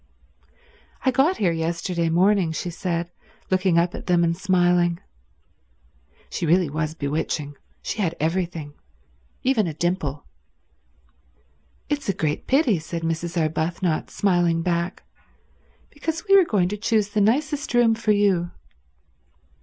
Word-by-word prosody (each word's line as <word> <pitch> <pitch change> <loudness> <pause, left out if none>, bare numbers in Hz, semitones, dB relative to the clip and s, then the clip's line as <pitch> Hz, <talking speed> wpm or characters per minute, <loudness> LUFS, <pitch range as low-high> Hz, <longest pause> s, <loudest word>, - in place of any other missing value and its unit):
"I 260 - +4
got 280 +9 +2
here 185 -5 +2
yesterday 165 +1 -1
morning," 185 +1 +3
she 175 +2 -4
said, 170 -1 -3 0.4
looking 185 -2 +2
up 175 +1 +2
at - - -8
them 175 -1 +3
and 170 0 +1
smiling. 175 -2 +2 1.3
She 170 - -3
really 170 -2 +3
was 155 0 -2
bewitching. 145 0 -3 0.3
She 215 - -3
had 170 -4 0
everything, 165 -2 -2 0.7
even 245 -7 +2
a 155 - -5
dimple. 160 -4 -2 1.6
"It's 290 -6 -2
a - - +2
great 150 -2 -2
pity," 260 - +3
said 165 +1 -6
Mrs. 165 +1 -2
Arbuthnot, 160 +1 -1
smiling 175 -4 +1
back, 170 +1 -2 0.9
"because 325 +2 -4
we 395 - +6
were 385 -2 +7
going 190 - +1
to 210 - -4
choose 215 -1 +1
the 210 0 0
nicest 285 +7 +1
room 235 -2 +5
for 225 -1 0
you." 195 -4 +2
175 Hz, 130 wpm, -23 LUFS, 165-205 Hz, 1.6 s, were